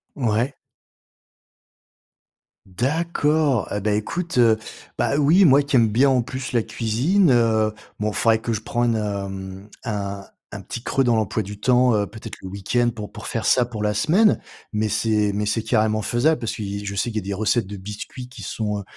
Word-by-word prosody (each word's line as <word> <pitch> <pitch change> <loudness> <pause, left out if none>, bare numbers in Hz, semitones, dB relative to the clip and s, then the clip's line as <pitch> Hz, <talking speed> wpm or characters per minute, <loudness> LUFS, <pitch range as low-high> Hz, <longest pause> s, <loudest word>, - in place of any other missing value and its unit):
Ouais. 120 +1 0 2.1
D'accord! 150 - 0
Et 105 - -1
bah, 105 +1 -1
écoute, 145 +9 -2
heu, 115 -2 +5 0.4
bah, 140 - +1
oui 160 +7 +5
moi 140 -2 +6
qui 140 -1 -1
aime 115 -3 +5
bien 125 +6 +3
en 130 -2 +2
plus 130 +2 -6
la 120 -3 +1
cuisine, 135 - +1
heu 110 -3 +3 0.3
bon 105 0 0
faudrait 110 +1 +2
que 115 0 -2
je 110 - -3
prends 120 +2 -1
une, 115 -1 +2
hem 100 -2 -5
un 100 -3 -4 0.3
un - - -7
petit 120 - -7
creux 135 +2 0
dans 120 -2 +3
l'emploi 110 0 0
du 100 +1 -9
temps, 125 +2 +4
heu, 105 -1 0
peut-être 110 +2 -9
le - - -7
week-end 100 +5 0
pour 105 -2 -7
pour - - -9
faire - - -3
ça 125 - +4
pour 110 -3 -5
la 105 0 +1
semaine. 180 - +3 0.3
Mais 105 0 0
c'est 105 -1 +1
mais 105 0 -1
c'est 110 +2 0
carrément 110 -1 +1
faisable, 120 +9 +1
parce 115 -2 -3
qu'il 100 -1 -5
je 100 - -4
sais 100 - 0
qu'il 110 - -4
y - - +2
a - - -6
des - - -1
recettes 110 +1 +1
de 100 +1 -7
biscuits 105 +6 -8
qui 125 - -11
sont, 105 -2 -3
heu - - -7
110 Hz, 200 wpm, -22 LUFS, 105-125 Hz, 2.1 s, moi